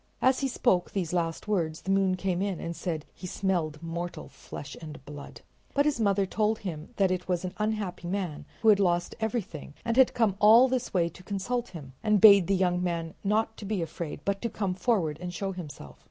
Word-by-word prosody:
As 260 0 +3
he 275 - 0
spoke 215 -8 +1
these 180 -4 -3
last 165 +2 -1
words 165 -6 -1
the 190 - -2
moon 195 -1 +3
came 185 -1 -1
in 195 -3 -1
and 170 0 -4
said 160 -4 -3
he 180 - -8
smelled 170 -5 -1
mortal 170 +1 -5
flesh 140 0 -9
and 150 -4 -9
blood. 145 -1 -10 0.3
But 285 +1 +4
his 300 -5 +1
mother 200 -2 +2
told 215 +3 0
him 165 -6 -6
that 195 -2 +2
it 180 -1 -2
was 180 -1 -1
an 180 - -4
unhappy 210 -5 -2
man 180 -5 -3 0.2
who 220 - +6
had 205 -2 +6
lost 175 -2 +1
everything 210 -10 -4
and 230 +1 0
had 265 -1 +5
come 220 -5 +2
all 225 +5 +8
this 255 -1 -2
way 175 -3 +2
to 170 - -14
consult 215 +6 -2
him, 150 -8 -10
and 215 -2 +3
bade 200 -4 +8
the 195 - +3
young 180 -1 +1
man 170 -2 -2
not 220 +2 +1
to 205 - -8
be 200 -4 -1
afraid, 165 -2 -6
but 200 0 -1
to 235 - -1
come 200 -3 -2
forward 180 -6 0
and 180 -1 -5
show 195 +3 -2
himself. 150 - -9
185 Hz, 215 wpm, -28 LUFS, 170-210 Hz, 0.3 s, all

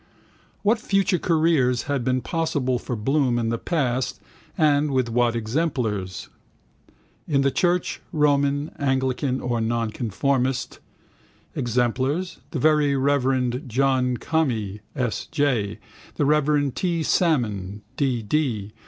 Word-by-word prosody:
What 220 +3 +3
future 195 -3 +1
careers 155 -8 +2
had 140 -3 -1
been 130 +1 +1
possible 145 -3 -1
for 125 - -4
Bloom 130 +2 +1
in 115 -1 0
the 115 0 -1
past 130 -7 -1 0.4
and 150 -1 +3
with 130 -3 0
what 120 0 +2
exemplars? 110 - -2 1.0
In 140 -3 +2
the 140 0 +2
church, 175 +3 0
Roman, 145 -1 +2
Anglican 130 -1 0
or 120 -2 -1
Nonconformist: 120 +3 -1 0.8
exemplars, 130 +9 -1
the - - -4
very 150 0 +3
reverend 130 -2 +1
John 130 0 +1
Conmee 115 -12 -1 0.2
S. 125 -6 -2
J., 125 -9 0 0.4
the 145 - +1
reverend 145 -2 +2
T. 170 -3 0
Salmon, 105 - 0
D. 130 -5 0
D. 110 -5 -1
130 Hz, 115 wpm, -24 LUFS, 120-150 Hz, 1.0 s, What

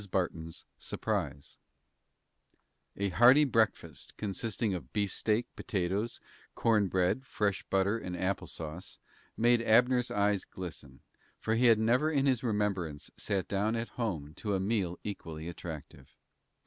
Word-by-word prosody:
BARTON'S 80 -3 -3
SURPRISE 70 - -3 1.4
A 100 0 0
hearty 125 +9 +7
breakfast, 110 - 0
consisting 105 +1 -2
of 80 -9 -6
beefsteak, 105 +2 0
potatoes, 100 +1 -2 0.4
corn 110 -3 +3
bread, 95 +8 +1
fresh 105 -6 -1
butter 100 +3 +2
and 90 -4 -5
apple 95 +2 -1
sauce, 80 +2 -7 0.4
made 120 +1 +4
Abner's 125 +2 +4
eyes 100 -1 +1
glisten, 75 -8 -9 0.4
for 110 - -1
he 120 +2 +4
had 115 -2 +7
never 120 +8 +3
in 140 -3 +2
his 130 -3 +2
remembrance 100 -9 -1
sat 95 -3 -2
down 105 +3 0
at 115 0 -3
home 80 -11 -3
to 105 -2 -1
a - - 0
meal 95 -3 0
equally 80 -6 -6
attractive. 80 -3 -8
100 Hz, 130 wpm, -31 LUFS, 90-115 Hz, 1.4 s, hearty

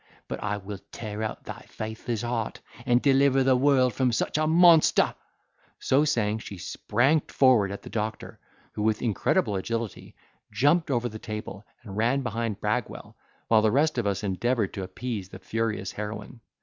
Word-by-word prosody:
But - - -5
I 105 -1 -1
will 100 0 -7
tear 110 -2 -6
out 110 - -4
thy - - -8
faithless 110 +1 -4
heart, 120 -2 -3 0.3
and 120 0 +3
deliver 135 -1 +4
the 130 0 +4
world 130 -2 +3
from 130 -2 +1
such 115 - -1
a 155 - +1
monster." 165 0 +5 0.6
So 140 +3 +2
saying, 110 -7 0
she 100 -3 -8
sprang 120 - +1
forward 125 -9 +3
at 100 - -7
the - - -9
doctor, 110 0 -4 0.3
who - - -5
with 110 0 +1
incredible 105 -2 +1
agility, 115 +2 -4 0.4
jumped 155 +5 +2
over 120 -3 0
the 110 -2 -8
table, 105 -2 -7 0.2
and 100 -4 -9
ran 120 +5 +2
behind 115 -3 -3
Bragwell, - - -3 0.3
while 110 -1 +5
the 110 - +3
rest 145 +3 +2
of 110 - -1
us 100 +1 -1
endeavoured 105 +3 0
to 95 - -4
appease 100 0 -5
the - - -9
furious 105 0 -2
heroine. 105 +3 -7
115 Hz, 170 wpm, -26 LUFS, 105-130 Hz, 0.6 s, monster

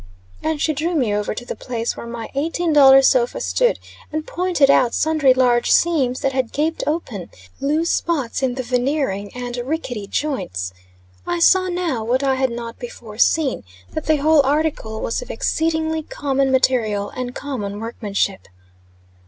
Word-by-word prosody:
And 315 -1 -1
she 310 - +1
drew 325 +4 -1
me 245 -9 +1
over 210 0 -1
to 240 - -7
the - - -5
place 235 -2 -3
where - - -8
my 235 -1 -7
eighteen 325 +4 -1
dollar 270 -2 +8
sofa - - +3
stood, - - +1 0.3
and 310 0 -3
pointed 345 -6 +2
out 245 -3 +3
sundry 310 -4 +3
large 250 -2 +3
seams 275 -7 +2
that 270 - 0
had 260 -3 -1
gaped 315 +3 -1
open, 255 - -3 0.3
loose 310 +4 +1
spots 285 -10 -1
in 255 -2 0
the 260 - -3
veneering, 245 -5 -1
and 245 -1 -5
rickety 245 -5 -4
joints. 95 - -3 0.5
I 175 - 0
saw 370 - +4
now, 345 -10 -1
what 250 +4 0
I 270 -1 +2
had 260 0 +1
not 235 0 -7
before 230 -3 -9
seen, 300 -2 +2 0.3
that - - -5
the 310 - +4
whole 300 0 +4
article 280 -6 -1
was - - -2
of - - -10
exceedingly 320 +5 0
common 275 -3 -1
material 225 -6 +1
and 250 -1 -5
common 210 -8 -4
workmanship. 205 -4 -2
265 Hz, 165 wpm, -20 LUFS, 235-310 Hz, 0.5 s, dollar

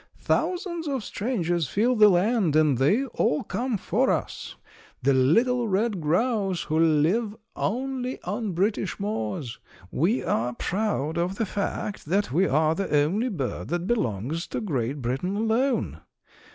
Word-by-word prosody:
Thousands 345 -3 -1
of 270 -5 -2
strangers 175 - -1
fill 235 - +1
the 210 -2 +7
land, 190 -2 +2
and 150 -5 +3
they 200 - +3
all 185 - 0
come 245 -2 -2
for - - +1
us, - - -2 0.5
the 140 +1 +4
little 230 - +3
red 205 -1 0
grouse 195 +3 +1
who 155 +1 -1
live 165 +8 +2 0.2
only 255 +3 -2
on 205 +2 -3
British 200 +3 -1
moors. 120 - -3 0.3
We 185 - +1
are 120 +2 -1
proud 175 - -1
of 180 +3 -1
the 225 - -1
fact 200 0 -3
that 195 +2 +1
we 180 +7 +3
are 155 +3 +2
the 195 +3 -3
only 210 +12 0
bird 145 - -4
that 175 0 -2
belongs 150 - -1
to - - -3
Great 135 - -2
Britain 135 +11 -1
alone. 225 +5 0
195 Hz, 145 wpm, -26 LUFS, 155-230 Hz, 0.5 s, the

